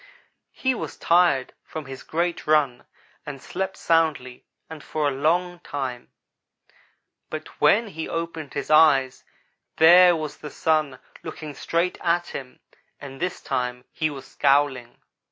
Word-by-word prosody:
He 260 -1 0
was 245 - -6
tired 170 -7 +3
from 155 -2 -7
his 135 0 -9
great 170 +1 -2
run 145 -5 +2 0.4
and 140 -2 -7
slept 190 +7 -4
soundly 155 -7 0 0.2
and 160 -2 -10
for 155 -2 -1
a - - +1
long 175 +6 0
time, 130 -7 -5 1.2
but - - -8
when 225 +1 +4
he 160 -4 -6
opened 165 -3 -5
his 140 - -3
eyes 145 -4 +4 0.5
there 175 +2 +8
was 155 -2 -5
the 150 - -8
Sun 155 -5 0 0.2
looking 155 -2 -7
straight 170 +5 -1
at 175 0 0
him, 130 -2 -8 0.4
and 135 -1 -10
this 180 0 -2
time 125 -1 -3
he 155 - -1
was 135 -2 -9
scowling. 135 -4 +1
155 Hz, 135 wpm, -24 LUFS, 135-170 Hz, 1.2 s, there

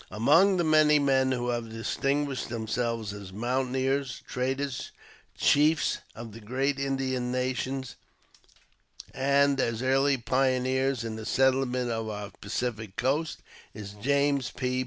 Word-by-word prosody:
Among 165 - +4
the 175 - +2
many 155 -1 +5
men 135 -2 +2
who 125 -1 -1
have 120 -1 -2
distinguished 135 +5 -2
themselves 115 -1 -2
as 100 -2 -9
mountaineers, 130 +4 -1
traders, 130 +1 -2 0.5
chiefs 150 +1 +3 0.2
of 115 0 -8
the 110 - -10
great 135 +5 -1
Indian 130 -2 -1
nations, 130 0 -2 1.2
and 140 +1 +2
as 115 -1 -1
early 135 +1 +3
pioneers 130 +1 +1
in 110 -1 -5
the 110 - -7
settlement 130 -2 +1
of 115 -1 -3
our 105 -1 -6
Pacific 110 -1 -3
coast, 150 +5 -1 0.3
is 105 -2 -7
James 140 0 +1
P. 125 0 -2
130 Hz, 125 wpm, -28 LUFS, 115-135 Hz, 1.2 s, many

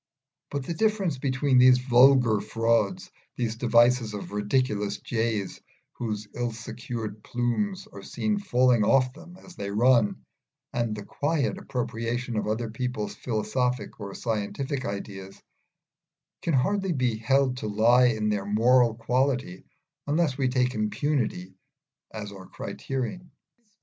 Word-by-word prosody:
But 140 -2 -4
the 170 - -3
difference 195 -6 0
between 130 0 +2
these 125 0 +7
vulgar 125 -3 +5
frauds, 115 - 0 0.3
these 115 -2 -1
devices 120 -1 +3
of 100 - -7
ridiculous 105 0 0
jays 110 -4 -2 0.3
whose 105 -3 -4
ill 120 -1 -2
secured 115 -2 -6
plumes 180 - -1
are 215 - -12
seen 210 -1 -2
falling 125 - +3
off 130 +3 +3
them 175 +4 -13
as 185 -1 -15
they 100 -9 -5
run, 110 - +3 0.5
and 120 -3 -1
the 105 -1 -8
quiet 145 -1 -1
appropriation 120 0 -3
of 105 - -1
other 110 +1 -2
people's 120 -2 -3
philosophic 125 +3 -2
or 100 -2 -7
scientific 130 +5 -3
ideas, 100 -1 -6 1.0
can 165 - 0
hardly 195 +7 +1
be 125 -5 0
held 130 +3 +2
to 110 - -4
lie 115 +4 +5
in 110 -3 0
their 100 -2 -1
moral 115 +2 +4
quality 125 -4 -1 0.4
unless 150 -2 +1
we 135 -1 0
take 125 0 +1
impunity 110 -3 -1 0.6
as 105 -2 -6
our 95 -2 -11
criterion. 135 +7 -5
120 Hz, 130 wpm, -26 LUFS, 110-130 Hz, 1.0 s, these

